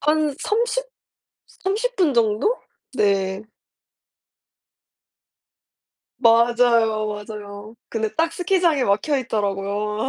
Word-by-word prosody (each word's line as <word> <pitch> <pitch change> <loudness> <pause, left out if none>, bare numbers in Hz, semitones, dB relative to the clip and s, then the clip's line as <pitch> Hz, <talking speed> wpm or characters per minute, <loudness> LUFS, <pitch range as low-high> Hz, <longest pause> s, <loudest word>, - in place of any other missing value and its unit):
한 300 0 +1
30, 475 +3 0 0.6
30 450 +6 -3
분정도? 255 - +2 0.4
네. 195 -3 +1 2.8
맞아요, 230 -2 +3
맞아요. 210 0 -8
근데 220 -1 -2
딱 330 +1 +1
스키장에 350 -6 +1
막혀 265 +9 +1
있더라고요. 210 -1 -2
230 Hz, 150 characters per minute, -22 LUFS, 210-315 Hz, 2.8 s, 맞아요